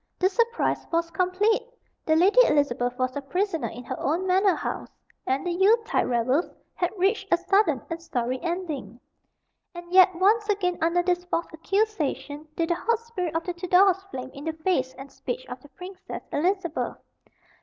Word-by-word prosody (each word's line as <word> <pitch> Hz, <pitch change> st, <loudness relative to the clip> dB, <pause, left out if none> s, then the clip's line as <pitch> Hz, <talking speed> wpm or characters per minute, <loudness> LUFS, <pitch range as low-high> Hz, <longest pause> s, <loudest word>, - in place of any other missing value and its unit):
The 370 Hz, -, +3 dB
surprise 470 Hz, +3 st, 0 dB
was 335 Hz, 0 st, 0 dB
complete. 370 Hz, +7 st, +2 dB, 0.5 s
The 315 Hz, -, +4 dB
Lady 385 Hz, +9 st, +5 dB
Elizabeth 245 Hz, -4 st, +1 dB
was 255 Hz, -1 st, -1 dB
a 285 Hz, -, -2 dB
prisoner 355 Hz, +3 st, -1 dB
in 245 Hz, -, -9 dB
her 245 Hz, -, -5 dB
own 335 Hz, +6 st, 0 dB
manor 375 Hz, 0 st, +3 dB
house, -, -, -4 dB, 0.4 s
and 265 Hz, +4 st, 0 dB
the 355 Hz, -, 0 dB
Yule 385 Hz, +6 st, +5 dB
tide -, -, 0 dB
revels 255 Hz, +7 st, +1 dB, 0.2 s
had 355 Hz, -, 0 dB
reached 390 Hz, +2 st, 0 dB
a 345 Hz, -, +6 dB
sudden 355 Hz, -, +2 dB
and 330 Hz, 0 st, -5 dB
sorry 255 Hz, -6 st, -2 dB
ending. 320 Hz, -, -4 dB, 0.8 s
And 345 Hz, 0 st, -9 dB
yet, 370 Hz, -1 st, +7 dB
once 420 Hz, +4 st, +3 dB
again, 365 Hz, -4 st, 0 dB
under 335 Hz, +2 st, +2 dB
this 355 Hz, 0 st, 0 dB
false 340 Hz, -1 st, -1 dB
accusation, 320 Hz, -5 st, -2 dB
did 335 Hz, 0 st, 0 dB
the -, -, +3 dB
hot 465 Hz, +5 st, +1 dB
spirit 425 Hz, -8 st, -5 dB
of 330 Hz, -, 0 dB
the 360 Hz, -, -3 dB
Tudors 365 Hz, +2 st, +3 dB
flame 260 Hz, -5 st, -6 dB
in 280 Hz, +2 st, -9 dB
the 320 Hz, -, -1 dB
face 315 Hz, -5 st, -1 dB
and 270 Hz, 0 st, -10 dB
speech -, -, -5 dB
of -, -, -8 dB
the 290 Hz, -, -16 dB
Princess 360 Hz, +7 st, -9 dB
Elizabeth. 345 Hz, +1 st, -1 dB
350 Hz, 175 wpm, -26 LUFS, 295-385 Hz, 0.8 s, yet